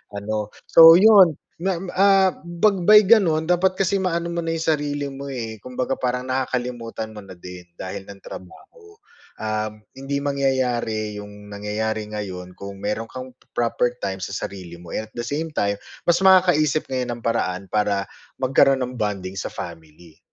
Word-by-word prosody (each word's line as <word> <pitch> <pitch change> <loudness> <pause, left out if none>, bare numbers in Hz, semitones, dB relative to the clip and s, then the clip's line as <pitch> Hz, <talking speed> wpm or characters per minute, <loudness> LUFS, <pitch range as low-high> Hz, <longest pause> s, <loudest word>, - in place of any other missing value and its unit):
ano. 105 +1 -3 0.2
So 165 0 +9
'yun 190 -5 +7 0.2
ma, 185 0 -2 0.2
ah, 195 -1 +4
'pag 175 +2 0
may 210 +3 +9
ganun 170 -8 +4
dapat 185 +2 +2
kasi 195 0 +1
maano 170 -3 -1
mo 170 0 -3
na 165 - -2
yung 165 0 -2
sarili 145 -1 -3
mo 140 0 -7
eh, 115 -4 -5
kumbaga 125 +1 -2
parang 125 0 -2
nakakalimutan 120 -4 -3
mo 105 - -9
na 95 - -13
din 90 0 -10 0.2
dahil 95 +1 -6
ng 100 0 -12
trabaho. 425 - -13 0.4
Um, 110 0 -3 0.2
hindi 135 +1 -3
mangyayari 125 -6 -1
'yung 105 0 -11
nangyayari 105 +1 -3
ngayon 90 -4 -6
kung 100 0 -7
meron 105 +2 -2
kang 130 +1 -8 0.2
proper 120 +1 0
time 95 0 -2
sa 95 +1 -5
sarili 90 -4 -6
mo, 85 -1 -12
and 110 - -4
at - - -34
the 120 - -3
same 150 +6 -3
time 100 -8 -1 0.3
mas 170 0 +4
makakaisip 180 -6 +4
ngayon 125 -2 -2
ng - - -19
paraan 100 -5 -1
para 105 -2 +1 0.4
magkaroon 135 +1 +4
ng 125 0 -5
bonding 95 -2 -3
sa - - -3
family. 80 -1 -10
125 Hz, 165 wpm, -22 LUFS, 105-165 Hz, 0.4 s, So